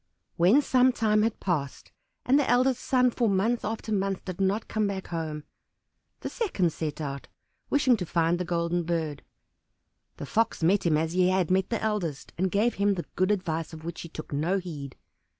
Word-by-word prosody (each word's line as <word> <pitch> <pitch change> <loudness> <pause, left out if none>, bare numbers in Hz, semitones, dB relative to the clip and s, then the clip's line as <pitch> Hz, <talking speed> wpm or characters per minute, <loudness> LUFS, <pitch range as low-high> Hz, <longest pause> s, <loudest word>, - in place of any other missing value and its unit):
When 195 +12 +5
some 255 -1 +4
time 215 -3 +2
had 225 0 0
passed, 150 -8 -3 0.3
and 270 +3 +4
the 285 - 0
eldest 250 +1 +2
son 250 -1 +3
for 235 -2 +1
month 210 +5 +1
after 220 +1 -4
month 195 -2 -1
did 185 0 -5
not 195 +3 0
come 215 -1 0
back 195 -1 -5
home, 155 -3 -4 0.8
the - - -4
second 190 - 0
set 155 -2 -4
out, 140 -2 -5 0.4
wishing 265 -4 +3
to 180 - -3
find 170 +1 +1
the - - 0
Golden 170 0 0
Bird. 160 -4 -2 1.0
The - - -6
Fox 225 +1 0
met 185 +2 +3
him 155 -2 +3
as 160 +1 -1
he 180 0 +3
had 185 -2 +1
met 190 0 +2
the 230 - -2
eldest, 190 -10 -2
and 190 +2 0
gave 215 +6 +2
him 200 0 +1
the 175 - -4
good 185 +1 +2
advice 170 -6 -1
of 160 0 -9
which 170 0 -5
he 170 - -8
took 155 -2 -8
no 165 +7 +1
heed. 150 -8 -6
185 Hz, 195 wpm, -27 LUFS, 165-220 Hz, 1.0 s, When